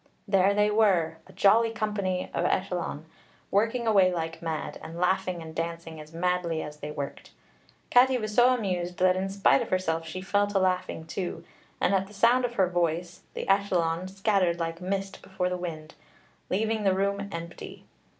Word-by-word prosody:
There 195 Hz, 0 st, +3 dB
they 210 Hz, 0 st, +3 dB
were, 180 Hz, -7 st, +2 dB
a -, -, -14 dB
jolly 225 Hz, +3 st, +4 dB
company 210 Hz, -4 st, -2 dB
of -, -, 0 dB
ellyllon, 180 Hz, -5 st, -1 dB, 0.5 s
working 225 Hz, +4 st, +1 dB
away 195 Hz, -4 st, +5 dB
like 165 Hz, -1 st, -4 dB
mad, 160 Hz, -2 st, -4 dB
and 160 Hz, +1 st, -8 dB
laughing 180 Hz, -1 st, 0 dB
and 160 Hz, 0 st, -9 dB
dancing 165 Hz, -1 st, -5 dB
as 155 Hz, 0 st, -13 dB
madly 170 Hz, -1 st, -1 dB
as 150 Hz, 0 st, -8 dB
they 150 Hz, 0 st, -6 dB
worked. 145 Hz, -2 st, -6 dB, 0.6 s
Catti 255 Hz, +1 st, +6 dB
was 215 Hz, -1 st, -4 dB
so 245 Hz, +3 st, +6 dB
amused 180 Hz, -7 st, -1 dB
that 185 Hz, 0 st, +4 dB
in 190 Hz, +1 st, -2 dB
spite 200 Hz, +6 st, +3 dB
of 235 Hz, -, -4 dB
herself 165 Hz, -3 st, -1 dB
she 185 Hz, -, -5 dB
fell 205 Hz, +2 st, +1 dB
to 205 Hz, -1 st, -1 dB
laughing 185 Hz, -3 st, 0 dB
too; 175 Hz, +2 st, -4 dB, 0.4 s
and 200 Hz, -, +2 dB
at 195 Hz, +1 st, 0 dB
sound 240 Hz, +5 st, +4 dB
of 240 Hz, -1 st, -4 dB
her 190 Hz, -4 st, +3 dB
voice 175 Hz, 0 st, -1 dB
the -, -, -3 dB
ellyllon 185 Hz, -3 st, +1 dB
scattered 195 Hz, -3 st, +1 dB
like 165 Hz, +1 st, -3 dB
mist 195 Hz, +1 st, -3 dB
before 185 Hz, -1 st, -2 dB
the 180 Hz, -, -2 dB
wind, 160 Hz, -3 st, -6 dB, 0.6 s
leaving 220 Hz, +3 st, 0 dB
the 190 Hz, -2 st, +3 dB
room 200 Hz, +1 st, -1 dB
empty. 170 Hz, 0 st, -8 dB
185 Hz, 175 wpm, -27 LUFS, 170-200 Hz, 0.6 s, Catti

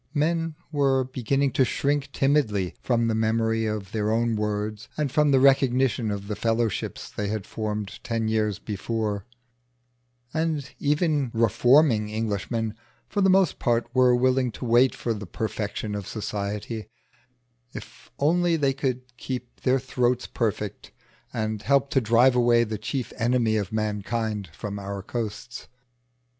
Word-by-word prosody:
Men 165 Hz, +1 st, 0 dB, 0.2 s
were 135 Hz, -3 st, +2 dB
beginning 130 Hz, +2 st, 0 dB
to 130 Hz, +1 st, +3 dB
shrink 140 Hz, +2 st, 0 dB
timidly 115 Hz, -11 st, +1 dB
from 115 Hz, -2 st, +1 dB
the 115 Hz, -, +1 dB
memory 115 Hz, 0 st, +1 dB
of 105 Hz, -2 st, -4 dB
their 105 Hz, -1 st, -1 dB
own 115 Hz, +1 st, +1 dB
words 105 Hz, +1 st, -3 dB
and 150 Hz, -3 st, 0 dB
from 150 Hz, +1 st, +3 dB
the 135 Hz, -2 st, +5 dB
recognition 130 Hz, -3 st, +3 dB
of 100 Hz, -1 st, -4 dB
the 105 Hz, -, -3 dB
fellowships 115 Hz, -1 st, -1 dB
they 105 Hz, -, -3 dB
had 105 Hz, -1 st, -3 dB
formed 105 Hz, -2 st, -4 dB
ten 115 Hz, -2 st, -1 dB
years 110 Hz, -2 st, +1 dB
before; 105 Hz, 0 st, -3 dB, 1.1 s
and 160 Hz, -3 st, -1 dB
even 150 Hz, -2 st, +1 dB
reforming 115 Hz, 0 st, +4 dB
Englishmen 110 Hz, +1 st, -2 dB, 0.3 s
for 205 Hz, -, -1 dB
the 190 Hz, -, +5 dB
most 190 Hz, -3 st, +3 dB
part 120 Hz, 0 st, 0 dB
were 125 Hz, -1 st, +5 dB
willing 130 Hz, 0 st, +2 dB
to 125 Hz, -, -6 dB
wait 120 Hz, +2 st, +4 dB
for 115 Hz, -, -2 dB
the 105 Hz, -2 st, -7 dB
perfection 105 Hz, +1 st, -3 dB
of 100 Hz, -2 st, -4 dB
society, 105 Hz, +1 st, -4 dB, 0.8 s
if -, -, -11 dB
only 170 Hz, +3 st, +2 dB
they 140 Hz, -4 st, +2 dB
could 130 Hz, -2 st, -2 dB
keep 125 Hz, -1 st, -6 dB
their 130 Hz, +1 st, +3 dB
throats 125 Hz, -1 st, 0 dB
perfect 105 Hz, -3 st, -3 dB, 0.4 s
and 110 Hz, -2 st, -2 dB
help 140 Hz, 0 st, +2 dB
to 135 Hz, -, +3 dB
drive 120 Hz, +3 st, +4 dB
away 120 Hz, -1 st, +4 dB
the 110 Hz, -2 st, -4 dB
chief 125 Hz, +3 st, -3 dB
enemy 115 Hz, -1 st, +2 dB
of 100 Hz, -4 st, -1 dB
mankind 110 Hz, -1 st, -2 dB
from 100 Hz, +4 st, -6 dB
our 100 Hz, 0 st, -5 dB
coasts. 120 Hz, +2 st, -5 dB
115 Hz, 145 wpm, -25 LUFS, 105-135 Hz, 1.1 s, the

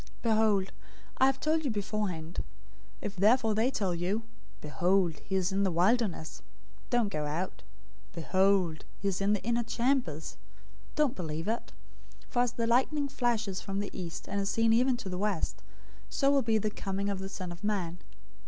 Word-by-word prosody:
024:025 -, -, -20 dB, 0.2 s
"Behold, 215 Hz, -4 st, +3 dB, 0.5 s
I 260 Hz, -, +7 dB
have 270 Hz, 0 st, +1 dB
told 315 Hz, +1 st, +1 dB
you 280 Hz, -, 0 dB
beforehand. 200 Hz, -6 st, -2 dB
024:026 -, -, -1 dB, 0.6 s
If 205 Hz, -, -4 dB
therefore 220 Hz, +3 st, +4 dB
they 220 Hz, +4 st, +2 dB
tell 200 Hz, -8 st, 0 dB
you, 185 Hz, +6 st, -1 dB, 0.4 s
'Behold, 175 Hz, +2 st, +1 dB
he 190 Hz, -, -4 dB
is 185 Hz, 0 st, +1 dB
in 195 Hz, +1 st, +1 dB
the 195 Hz, -, +3 dB
wilderness,' 180 Hz, -, +1 dB, 0.5 s
don't 240 Hz, -4 st, +2 dB
go 150 Hz, -4 st, -2 dB
out; 170 Hz, +5 st, -3 dB, 0.5 s
'Behold, 185 Hz, -1 st, +2 dB
he 200 Hz, -, -3 dB
is 195 Hz, 0 st, 0 dB
in 200 Hz, +1 st, +3 dB
the 205 Hz, -, -1 dB
inner 235 Hz, +2 st, +1 dB
chambers,' 235 Hz, -, -1 dB, 0.6 s
don't 300 Hz, -4 st, +2 dB
believe 160 Hz, -1 st, -4 dB
it. 230 Hz, +2 st, -2 dB, 0.6 s
024:027 -, -, -25 dB
For 245 Hz, -, 0 dB
as 245 Hz, -1 st, +2 dB
the 230 Hz, -, -1 dB
lightning 265 Hz, +5 st, +2 dB
flashes 235 Hz, -8 st, 0 dB
from 195 Hz, 0 st, -3 dB
the 205 Hz, -, -3 dB
east, 170 Hz, -2 st, -6 dB
and 200 Hz, 0 st, -1 dB
is 195 Hz, -, -1 dB
seen 225 Hz, 0 st, +3 dB
even 250 Hz, +2 st, +3 dB
to 230 Hz, -, -7 dB
the 180 Hz, -1 st, -3 dB
west, 205 Hz, -4 st, -1 dB, 0.5 s
so 275 Hz, 0 st, +2 dB
will 280 Hz, -1 st, +4 dB
be 225 Hz, -2 st, +2 dB
the 215 Hz, 0 st, 0 dB
coming 195 Hz, 0 st, -3 dB
of 200 Hz, -1 st, -1 dB
the 195 Hz, 0 st, -5 dB
Son 185 Hz, -2 st, -5 dB
of 175 Hz, +3 st, -10 dB
Man. 185 Hz, -5 st, -1 dB
200 Hz, 190 wpm, -30 LUFS, 185-235 Hz, 0.6 s, I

